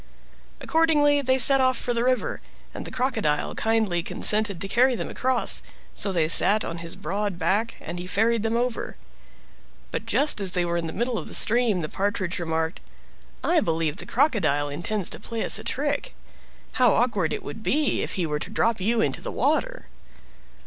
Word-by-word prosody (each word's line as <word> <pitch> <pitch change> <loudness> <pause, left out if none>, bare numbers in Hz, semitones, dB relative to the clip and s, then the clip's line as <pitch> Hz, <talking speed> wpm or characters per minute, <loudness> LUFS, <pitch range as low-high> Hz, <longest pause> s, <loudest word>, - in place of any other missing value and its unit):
Accordingly 295 -3 +3
they 260 -1 +2
set 270 +2 +5
off 255 -1 +2
for 245 - -2
the 235 0 0
river, 255 0 0 0.3
and - - -7
the - - -6
Crocodile 225 - -1
kindly 220 -6 0
consented 210 +1 +1
to 195 - -3
carry 250 +5 +3
them - - -4
across, 255 -1 0 0.3
so 200 - +2
they 165 -4 +1
sat 205 +6 +6
on 165 0 -5
his 170 0 -5
broad 200 +3 -3
back 195 +7 0
and 175 - -6
he 180 - -6
ferried 225 +4 +1
them 225 +1 0
over. 245 -1 -3 0.9
But - - -4
just 290 -7 +1
as 190 -2 -1
they 180 -1 +1
were 170 0 -2
in 165 -1 -3
the - - -5
middle 240 +3 -2
of - - -8
the - - -6
stream 225 -5 +2
the 155 - -3
Partridge 190 -1 -2
remarked. 160 0 -2 0.6
"I 345 -1 +3
believe 160 - -1
the - - -6
Crocodile 180 - +1
intends 175 +6 -2
to - - -2
play 230 -1 -4
us - - +2
a - - -8
trick. 290 - -2 0.6
How 250 -4 +4
awkward 210 -9 +1
if 255 - -1
he 180 - -1
were 150 -1 -2
to - - -6
drop 225 -3 0
you 225 +4 +1
into - - -1
the - - -5
water!" - - -1
220 Hz, 185 wpm, -24 LUFS, 175-250 Hz, 0.9 s, sat